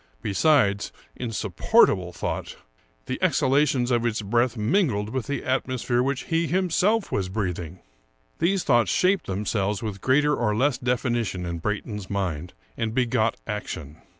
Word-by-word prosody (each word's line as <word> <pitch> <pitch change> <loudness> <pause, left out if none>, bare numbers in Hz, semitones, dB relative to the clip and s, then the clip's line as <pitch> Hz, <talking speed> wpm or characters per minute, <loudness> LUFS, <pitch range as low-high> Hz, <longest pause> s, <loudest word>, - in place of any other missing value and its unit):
Be 100 - -2
sides 100 -7 +3
— - - -31
insupportable 105 - +2
thought! - - -4 0.3
— - - -38
the - - -4
exhalations 130 -2 +2
of 120 -1 +2
its 115 -2 -1
breath 120 +3 +1
mingled 110 - +1
with 130 -1 -3
the 140 - -3
atmosphere 130 -2 0
which 135 0 -1
he 165 0 0
himself 190 +5 +1
was 95 -2 -1
breathing! 90 -4 -4 0.6
These 180 +3 +1
thoughts 120 - +3
shaped 190 +2 +2
themselves 100 +1 -1
with 100 -3 -5
greater 150 +3 +3
or 105 -3 0
less 130 +3 +1
definition 120 -6 -1
in 85 -1 -4
Brayton's 105 +1 -4
mind, 90 -4 -3 0.2
and 115 -1 -2
begot 115 -3 +1
action. 80 -8 -5
115 Hz, 150 wpm, -25 LUFS, 100-135 Hz, 0.6 s, sides